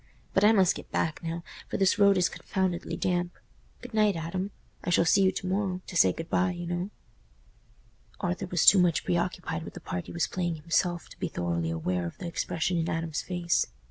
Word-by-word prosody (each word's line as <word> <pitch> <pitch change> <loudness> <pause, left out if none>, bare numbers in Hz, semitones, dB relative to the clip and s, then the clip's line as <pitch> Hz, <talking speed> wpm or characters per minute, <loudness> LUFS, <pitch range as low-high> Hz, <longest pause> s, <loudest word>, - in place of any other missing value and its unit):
But 190 - +3
I 210 - +7
must 190 -5 +4
get - - -10
back 160 +2 -1
now, 165 0 -4 0.3
for - - -2
this 195 +2 +3
road 200 -1 +6
is 180 - +4
confoundedly 185 -2 -2
damp. 175 -1 -1 0.5
Good 245 -1 -9
night, 210 -3 +3
Adam. 170 +4 -3 0.3
I - - -2
shall 170 -1 +4
see 195 +4 +5
you 190 -1 +4
to - - -4
morrow—to 185 -1 -2
say 95 - +6
good 165 - -6
bye, 180 0 +2
you 175 - -5
know." 175 +2 -2 1.3
Arthur 180 +2 -2
was 175 -3 +1
too 200 - +9
much 175 -3 +3
preoccupied 175 -1 -1
with - - -9
the - - -6
part 90 - -5
he - - -7
was 170 -3 0
playing 175 -1 -2
himself 170 +2 0
to - - -15
be - - -1
thoroughly 85 -1 -2
aware 85 +2 -1
of - - -9
the - - -7
expression 170 0 -1
in 165 - -1
Adam's 165 -1 -2
face. 175 -2 0
175 Hz, 205 wpm, -28 LUFS, 165-185 Hz, 1.3 s, too